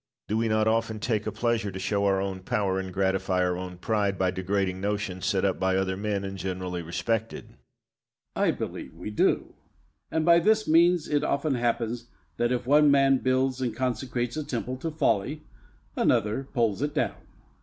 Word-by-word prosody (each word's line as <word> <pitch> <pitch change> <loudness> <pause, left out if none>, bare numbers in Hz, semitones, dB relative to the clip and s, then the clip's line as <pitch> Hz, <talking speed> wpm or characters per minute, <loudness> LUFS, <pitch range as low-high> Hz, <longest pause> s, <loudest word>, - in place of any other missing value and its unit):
Do 105 - -1
we 115 +1 +1
not 110 0 +2
often 110 -1 0
take 110 -1 -1
a - - -1
pleasure 115 -3 0
to 95 - -7
show 100 +1 0
our 95 -1 +2
own 95 -1 -3
power 95 0 -1
and 95 -1 -5
gratify 95 -1 +1
our 90 0 +1
own 90 0 -6
pride 100 0 0
by 95 -1 +1
degrading 95 0 -1
notions 100 -2 -2
set 100 -1 +1
up 95 - 0
by 95 0 +1
other 95 0 0
men 100 0 -2
and 95 0 -5
generally 90 -2 -3
respected? 90 +7 -3 0.8
Bayle. - - 0
I - - +4
believe - - -4
we 90 +5 -6
do; 105 - +1 0.6
and 160 -1 0
by 170 0 +7
this 215 +4 +2
means 170 +1 +4
it 145 -1 +1
often 140 +1 0
happens 120 -1 -1 0.3
that 120 +1 +1
if 125 -1 -1
one 150 +3 +5
man 135 -1 +4
builds 130 0 +1
and 120 -4 -1
consecrates 125 -1 -2
a 155 - -2
temple 130 -1 -4
to 165 +5 -3
folly, 150 -1 0 0.5
another 110 +6 +1
pulls 115 -5 0
it 145 +1 -2
down. - - +2
Locke. - - -20
110 Hz, 190 wpm, -27 LUFS, 95-130 Hz, 0.8 s, by